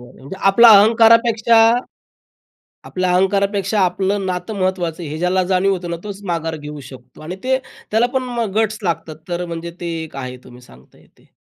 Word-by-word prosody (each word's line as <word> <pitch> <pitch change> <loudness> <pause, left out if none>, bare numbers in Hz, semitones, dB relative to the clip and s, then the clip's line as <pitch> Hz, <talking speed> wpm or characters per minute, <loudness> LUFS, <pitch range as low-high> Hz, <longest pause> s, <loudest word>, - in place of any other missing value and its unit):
बरं. 125 +1 -15
म्हणजे 140 +9 -9
आपला 235 +4 +7
अहंकारापेक्षा 230 +1 +4 1.3
आपला 185 -1 -2
अहंकारापेक्षा 200 +2 +1
आपलं 190 +2 -1
नातं 185 +4 -4
महत्त्वाचं 180 -3 -2
आहे, 150 - -6
हे 155 - -5
ज्याला 180 +2 +1
जाणीव 190 +1 +1
होतं 175 -2 -4
ना, 170 - -3
तोच 200 -1 -7
माघार 165 -2 -3
घेऊ 150 0 -9
शकतो 125 +1 -14
आणि 175 +4 -6
ते 260 0 +1 0.3
त्याला 225 +3 +2
पण 260 - +1
मग 235 -5 -3
गट्स 215 -1 0
लागतात 165 -3 -3
तर 175 0 -3
म्हणजे 170 0 -6
ते 175 - -5 0.2
एक 155 -3 -10
आहे 130 -1 -6
तुम्ही 125 0 -14
सांगताय 65 - -20
ते. - - -26
185 Hz, 180 wpm, -18 LUFS, 160-210 Hz, 1.3 s, आपला